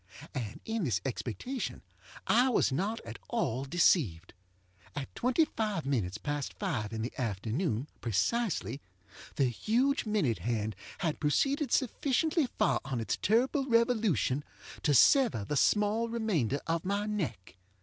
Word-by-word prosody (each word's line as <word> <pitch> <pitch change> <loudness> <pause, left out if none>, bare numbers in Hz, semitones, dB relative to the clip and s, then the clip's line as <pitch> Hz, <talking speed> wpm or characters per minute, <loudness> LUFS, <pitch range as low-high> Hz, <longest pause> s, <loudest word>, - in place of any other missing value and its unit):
And 115 -7 -4
in 225 -2 -1
this 115 - +1
expectation 135 - -4 0.4
I 250 +3 +4
was 240 - +2
not 200 +11 -1
at 115 0 -9
all 130 +4 -1
deceived. 135 - +2 0.6
At 140 -2 -5
twenty 255 +6 +2
five 210 - -2
minutes 110 -9 -1
past 145 +1 -3
five 130 - -2
in 110 -1 -3
the 120 - -4
afternoon, 115 - -1
precisely, 140 - 0 0.5
the 140 - +3
huge 235 - +1
minute 170 - +1
hand 110 +1 -2 0.2
had 160 -5 -2
proceeded 275 - +1
sufficiently 285 +4 +1
far - - +2
on 135 -3 -3
its 110 -3 -1
terrible 260 +6 +2
revolution 225 - +2 0.4
to 145 -2 +2
sever 230 - +5
the 150 - -2
small 210 - +2
remainder 185 - 0
of 165 0 -1
my 200 +2 -1
neck. 135 - -4
160 Hz, 135 wpm, -31 LUFS, -, 0.6 s, sever